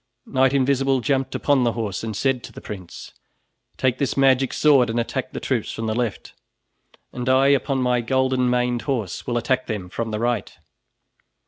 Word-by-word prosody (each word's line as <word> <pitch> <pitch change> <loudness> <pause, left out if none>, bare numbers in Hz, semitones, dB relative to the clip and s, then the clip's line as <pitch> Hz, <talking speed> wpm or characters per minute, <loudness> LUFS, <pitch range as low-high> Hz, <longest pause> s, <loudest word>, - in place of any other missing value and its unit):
Knight 130 0 +2
Invisible 135 0 +2
jumped 135 +3 -1
upon 140 -3 +2
the 120 -1 +1
horse 110 -4 -3
and 110 -3 -4
said 135 -1 +1
to - - -9
the - - -10
prince: 95 -5 -9 0.6
"Take 130 -1 0
this 140 - -1
magic 135 -1 +3
sword 140 -6 +4
and 115 +1 -1
attack 115 - -3
the - - -5
troops - - -2
from 115 - -5
the 110 - -1
left, 120 -3 -3 0.8
and 125 0 -3
I 135 +1 +4
upon 135 -1 +1
my 125 -1 +2
golden 130 +1 +1
maned 125 -1 +1
horse 110 -10 -3
will 120 -1 0
attack 130 +2 0
them 105 -6 -4
from 115 +4 -3
the 105 - -2
right." 120 +2 -2
125 Hz, 185 wpm, -22 LUFS, 115-135 Hz, 0.8 s, sword